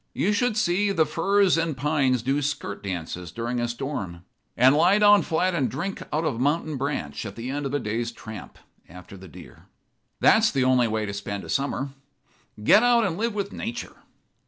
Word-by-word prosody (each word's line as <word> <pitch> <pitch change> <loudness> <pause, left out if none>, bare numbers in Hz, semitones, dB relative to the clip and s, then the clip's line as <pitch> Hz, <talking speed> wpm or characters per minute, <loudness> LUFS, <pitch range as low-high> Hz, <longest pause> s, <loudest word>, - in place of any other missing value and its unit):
You 210 - +1
should 220 +1 0
see 200 0 +1
the 160 -5 +2
firs 195 +3 +2
and 165 -4 -2
pines 135 -4 +1
do 135 +3 0
skirt 145 -8 -3
dances 90 -2 -5
during 120 +4 -3
a 120 - 0
storm; 120 -9 -5 0.3
and 130 +4 +6
lie 175 +6 +4
down 205 -1 +6
flat 180 +3 0
and 145 -7 0
drink 180 +9 -4
out 155 +2 -1
of 145 -7 -1
a - - -6
mountain 150 +3 0
branch 130 - -3
at 100 -2 -7
the 120 +3 -5
end 145 0 -3
of 135 - -6
a - - +1
day's 115 +1 -3
tramp 110 -2 -10 0.3
after 90 +3 -12
the 95 0 -12
deer. 80 -7 -14 0.5
That's 220 0 +5
the 135 -2 0
only 130 -2 +3
way 110 -1 -1
to 100 - -5
spend 100 0 -5
a - - -10
summer. 140 0 -1 0.7
Get 205 - +6
out 240 -1 +4
and 180 -4 -1
live 225 +3 -2
with 200 -1 -3
nature." 235 +2 -6
140 Hz, 200 wpm, -25 LUFS, 115-180 Hz, 0.7 s, and